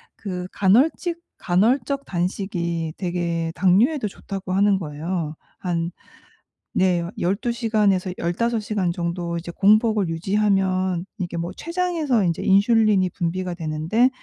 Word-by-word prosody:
그 180 Hz, -3 st, -5 dB
간헐직 295 Hz, -, +2 dB, 0.2 s
간헐적 235 Hz, +9 st, +1 dB
단식이 170 Hz, -3 st, -2 dB
되게 170 Hz, -2 st, -2 dB
당뇨에도 210 Hz, -, +3 dB
좋다고 195 Hz, -1 st, -6 dB
하는 200 Hz, 0 st, +4 dB
거예요. 160 Hz, 0 st, -4 dB, 0.2 s
한 170 Hz, -2 st, -2 dB, 0.8 s
네 180 Hz, -2 st, +2 dB, 0.2 s
12 200 Hz, +7 st, 0 dB
시간에서 210 Hz, -5 st, +1 dB
15 230 Hz, +7 st, 0 dB
시간 205 Hz, -4 st, -1 dB
정도 170 Hz, 0 st, -3 dB
이제 170 Hz, +1 st, -6 dB
공복을 215 Hz, 0 st, +3 dB
유지하면 190 Hz, 0 st, +1 dB
이게 175 Hz, -2 st, -3 dB
뭐 170 Hz, +1 st, -3 dB
췌장에서 335 Hz, -, 0 dB
인제 170 Hz, -2 st, -1 dB
인슐린이 200 Hz, -1 st, +4 dB
분비가 180 Hz, +2 st, -2 dB
되는데 165 Hz, +9 st, +1 dB
190 Hz, 260 characters per minute, -23 LUFS, 170-215 Hz, 0.8 s, 하는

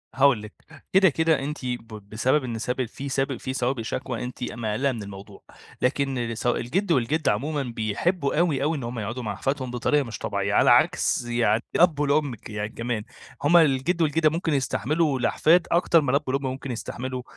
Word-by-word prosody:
هاقول 135 Hz, -4 st, +4 dB
لِك، 105 Hz, 0 st, -10 dB, 0.4 s
كده 190 Hz, -1 st, +6 dB
كده 160 Hz, +1 st, +2 dB
أنتِ 145 Hz, +3 st, -4 dB
ب 120 Hz, -2 st, -4 dB, 0.2 s
بسبب 130 Hz, +6 st, +1 dB
إن 120 Hz, -3 st, -4 dB
سب 125 Hz, +2 st, -1 dB
في 135 Hz, +4 st, -7 dB
سب 135 Hz, -1 st, -1 dB
في 130 Hz, -, -5 dB
سوابق 125 Hz, -1 st, -1 dB
شكوى 125 Hz, +1 st, -4 dB
أنتِ 125 Hz, 0 st, -6 dB
مقلّقة 120 Hz, +4 st, -1 dB
من 115 Hz, -4 st, -5 dB
الموضوع، 100 Hz, 0 st, -11 dB, 0.4 s
لكن 125 Hz, -3 st, 0 dB
س 120 Hz, -, -3 dB
الجد 170 Hz, -, 0 dB
والجدة 145 Hz, +2 st, +2 dB
عمومًا 140 Hz, +7 st, -2 dB
بيحبوا 125 Hz, -, -1 dB
أوي، 155 Hz, -6 st, +1 dB
أوي، 155 Hz, +2 st, 0 dB
إن 135 Hz, -, -6 dB
هُم 120 Hz, 0 st, -4 dB
يقعدوا 120 Hz, +4 st, -4 dB
مع 110 Hz, -, -3 dB
أحفادهم 135 Hz, -2 st, -2 dB
بطريقة 140 Hz, +4 st, +1 dB
مش 115 Hz, -4 st, -7 dB
طبيعية، -, -, -2 dB
على -, -, +5 dB
عكس -, -, +3 dB
يعني 120 Hz, -1 st, +1 dB
الأب 165 Hz, -4 st, +4 dB
والأم 145 Hz, -3 st, +1 dB
ك 105 Hz, -, -13 dB
يعني 105 Hz, 0 st, -3 dB
كمان، 115 Hz, -1 st, -3 dB, 0.4 s
هُم 160 Hz, +4 st, +6 dB
الجد 160 Hz, +2 st, +3 dB
والجدة 155 Hz, 0 st, +3 dB
ممكن 165 Hz, 0 st, -1 dB
يستحملوا 145 Hz, +2 st, 0 dB
الأحفاد 165 Hz, +7 st, +3 dB
أكتر 170 Hz, -1 st, +4 dB
ما 140 Hz, -4 st, 0 dB
الأب 140 Hz, +2 st, +2 dB
والأم 135 Hz, +2 st, 0 dB
ممكن 130 Hz, 0 st, -4 dB
يستحملوا 125 Hz, +2 st, -5 dB
130 Hz, 185 wpm, -25 LUFS, 120-150 Hz, 0.4 s, كده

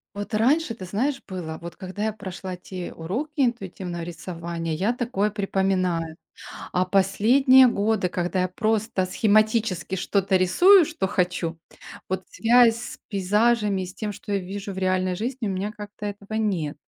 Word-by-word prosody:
Вот 205 Hz, +2 st, -6 dB
раньше, 250 Hz, +4 st, +2 dB
ты 190 Hz, -, -9 dB
знаешь, 260 Hz, +9 st, -1 dB
было, 170 Hz, -4 st, -6 dB
вот 170 Hz, 0 st, -8 dB
когда 190 Hz, +3 st, -5 dB
я 220 Hz, -, 0 dB
прошла 190 Hz, -3 st, -7 dB
те 180 Hz, 0 st, -7 dB
уроки 225 Hz, -, -4 dB
интуитивного 190 Hz, -9 st, -2 dB
рисования, 170 Hz, -1 st, -5 dB
я 195 Hz, +8 st, +1 dB
такое 230 Hz, -4 st, -1 dB
припоминаю. 185 Hz, -5 st, -1 dB, 0.5 s
А 180 Hz, +1 st, +1 dB
последние 235 Hz, +8 st, +5 dB
годы, 205 Hz, -4 st, +1 dB
когда 180 Hz, +1 st, -1 dB
я 185 Hz, -, +1 dB
просто 215 Hz, 0 st, 0 dB
схематически 215 Hz, -3 st, +1 dB
что-то 195 Hz, 0 st, +1 dB
рисую, 350 Hz, -, +6 dB
что 295 Hz, -, -2 dB
хочу, 180 Hz, -3 st, -1 dB, 0.5 s
вот 190 Hz, 0 st, -3 dB
связь 235 Hz, 0 st, +5 dB
с 245 Hz, -, -7 dB
пейзажами, 210 Hz, 0 st, +1 dB
с 185 Hz, +1 st, -11 dB
тем, 210 Hz, 0 st, -3 dB
что 205 Hz, -, -9 dB
я 200 Hz, -, +2 dB
вижу 195 Hz, +2 st, -6 dB
в 190 Hz, -, -10 dB
реальной 185 Hz, -1 st, 0 dB
жизни, 240 Hz, +2 st, -3 dB
у -, -, -1 dB
меня 195 Hz, +3 st, -2 dB
как-то 210 Hz, 0 st, -9 dB
этого 205 Hz, +1 st, -6 dB
нет. 175 Hz, -10 st, -1 dB
195 Hz, 155 wpm, -24 LUFS, 185-220 Hz, 0.5 s, рисую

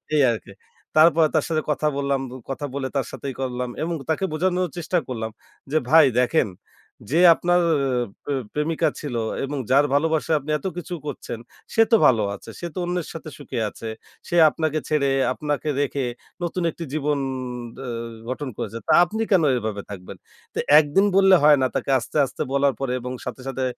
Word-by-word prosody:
এই 145 Hz, -, +5 dB
আরকি। 110 Hz, -3 st, -6 dB, 0.4 s
তারপরে 160 Hz, 0 st, +6 dB
তার 155 Hz, -, +2 dB
সাথে 155 Hz, -1 st, +1 dB
কথা 150 Hz, +1 st, 0 dB
বললাম। 140 Hz, -1 st, 0 dB
বো 130 Hz, -, -9 dB
কথা 145 Hz, +2 st, -3 dB
বলে 135 Hz, -1 st, -2 dB
তার 135 Hz, -3 st, +1 dB
সাথে 140 Hz, -, -7 dB
ই -, -, -11 dB
করলাম 125 Hz, -1 st, -2 dB
এবং 170 Hz, +1 st, -2 dB, 0.2 s
তাকে 175 Hz, +4 st, +1 dB
বোঝানোর 180 Hz, +2 st, 0 dB
চেষ্টা 175 Hz, +2 st, -1 dB
করলাম 110 Hz, -3 st, -4 dB, 0.4 s
যে, 155 Hz, -, +3 dB
ভাই 160 Hz, -1 st, +8 dB
দেখেন, 125 Hz, 0 st, +2 dB, 0.6 s
যে 165 Hz, -, +3 dB, 0.2 s
আপনার 175 Hz, 0 st, +2 dB, 0.6 s
প্রে 145 Hz, -, -2 dB, 0.2 s
প্রেমিকা 150 Hz, +2 st, +1 dB
ছিল 140 Hz, -5 st, -5 dB, 0.3 s
এবং 145 Hz, +1 st, -4 dB
যার 140 Hz, +2 st, +5 dB
ভালোবাসায় 160 Hz, +1 st, +2 dB
আপনি 150 Hz, +2 st, -5 dB
এত -, -, -16 dB
কিছু 175 Hz, +1 st, -5 dB
করছেন, 125 Hz, -5 st, -5 dB, 0.3 s
সে 225 Hz, -, +4 dB
তো -, -, +8 dB
ভালো 115 Hz, -4 st, +3 dB
আছে। -, -, -12 dB
সে 175 Hz, -, -4 dB
তো -, -, -11 dB
অন্যের 175 Hz, -1 st, -2 dB
সাথে 160 Hz, -1 st, -7 dB
সুখে 135 Hz, -4 st, -5 dB
আছে। 115 Hz, -, -8 dB, 0.4 s
সে 175 Hz, -, -2 dB
আপনাকে 155 Hz, -1 st, -1 dB
ছেড়ে, 145 Hz, -3 st, +2 dB, 0.2 s
আপনাকে 150 Hz, +1 st, -2 dB
রেখে 140 Hz, -2 st, -1 dB, 0.4 s
নতুন 175 Hz, +1 st, -2 dB
একটি 170 Hz, -, -8 dB
জীবন 150 Hz, -1 st, 0 dB, 0.7 s
অ -, -, -6 dB, 0.4 s
গঠন 130 Hz, +1 st, -3 dB
করেছে। 110 Hz, +2 st, -4 dB
তা -, -, +4 dB
আপনি 220 Hz, +5 st, -4 dB
কেন 180 Hz, -4 st, +5 dB
এভাবে 105 Hz, -3 st, -3 dB
থাকবেন? 95 Hz, -3 st, -9 dB, 0.4 s
তো -, -, -3 dB, 0.2 s
একদিন 155 Hz, +7 st, +3 dB
বললে 195 Hz, -1 st, +7 dB
হয় 150 Hz, -1 st, +7 dB
না, 130 Hz, -, +3 dB
তাকে 140 Hz, -, -1 dB
আস্তে, 120 Hz, -, -5 dB
আস্তে, 130 Hz, -, -7 dB
বলার 140 Hz, -1 st, +3 dB
পরে 130 Hz, -2 st, -1 dB
এবং 125 Hz, +1 st, -5 dB
সাথে, 130 Hz, -, -6 dB
সাথে, 130 Hz, 0 st, -3 dB
145 Hz, 185 wpm, -23 LUFS, 130-165 Hz, 0.7 s, ভাই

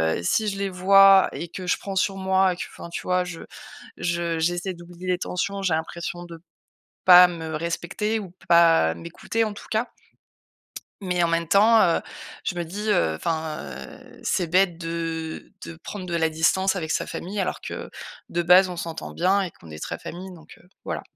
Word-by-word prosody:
heu, -, -, -4 dB
si 215 Hz, -, +1 dB
je 195 Hz, -1 st, -2 dB
les 200 Hz, -1 st, -1 dB
vois 195 Hz, +1 st, +6 dB
et 170 Hz, -, -6 dB
que 185 Hz, +1 st, -7 dB
je -, -, +2 dB
prends 195 Hz, -1 st, -6 dB
sur 195 Hz, 0 st, +1 dB
moi 190 Hz, -1 st, +2 dB
et -, -, -8 dB
que, -, -, -3 dB
enfin, 170 Hz, -, -10 dB
tu -, -, -5 dB
vois, 180 Hz, 0 st, +1 dB
je 180 Hz, -2 st, -8 dB, 0.6 s
je 170 Hz, -1 st, -1 dB
j'essaie 175 Hz, +3 st, -1 dB
d'oublier 175 Hz, +1 st, -11 dB
les 180 Hz, -1 st, +1 dB
tensions, 195 Hz, +2 st, -3 dB
j'ai 180 Hz, -4 st, +1 dB
l'impression 170 Hz, +2 st, -4 dB
de 165 Hz, -1 st, -11 dB, 0.6 s
pas 180 Hz, 0 st, +10 dB
me 160 Hz, -2 st, -5 dB
respecter 175 Hz, +7 st, -2 dB
ou 185 Hz, -4 st, -9 dB, 0.2 s
pas 165 Hz, -, +5 dB
m'écouter, 85 Hz, -, -3 dB
en 215 Hz, -, -3 dB
tout -, -, -11 dB
cas. 225 Hz, +3 st, 0 dB, 1.1 s
Mais 180 Hz, -2 st, 0 dB
en 170 Hz, -, +3 dB
même 165 Hz, -1 st, 0 dB
temps, 220 Hz, +3 st, +6 dB
heu, 170 Hz, -3 st, +3 dB, 0.4 s
je -, -, -2 dB
me 175 Hz, -, -2 dB
dis, 205 Hz, +6 st, -3 dB
heu, 80 Hz, -, +2 dB
enfin, 160 Hz, -, -3 dB
heu, 65 Hz, 0 st, -11 dB
c'est 180 Hz, -, 0 dB
bête 180 Hz, -1 st, +3 dB
de 165 Hz, -1 st, -5 dB
de 85 Hz, -1 st, -9 dB
prendre 200 Hz, -3 st, -7 dB
de 175 Hz, -, -4 dB
la 160 Hz, -1 st, +2 dB
distance 190 Hz, +5 st, +1 dB
avec 160 Hz, -3 st, -4 dB
sa -, -, 0 dB
famille 195 Hz, +3 st, -5 dB
alors 185 Hz, -, -2 dB
que, -, -, -6 dB, 0.4 s
de 175 Hz, -, -1 dB
base, 180 Hz, +2 st, +6 dB
on 180 Hz, -, -6 dB
s'entend 165 Hz, -1 st, -6 dB
bien 190 Hz, +3 st, +2 dB
et 185 Hz, -, -2 dB
qu'on 80 Hz, -, -16 dB
est 75 Hz, 0 st, -9 dB
très -, -, -4 dB
famille. 185 Hz, +3 st, -8 dB
Donc, 160 Hz, -3 st, -15 dB
heu, 180 Hz, -, -24 dB, 0.2 s
voilà. -, -, -4 dB
175 Hz, 200 wpm, -24 LUFS, 165-190 Hz, 1.1 s, pas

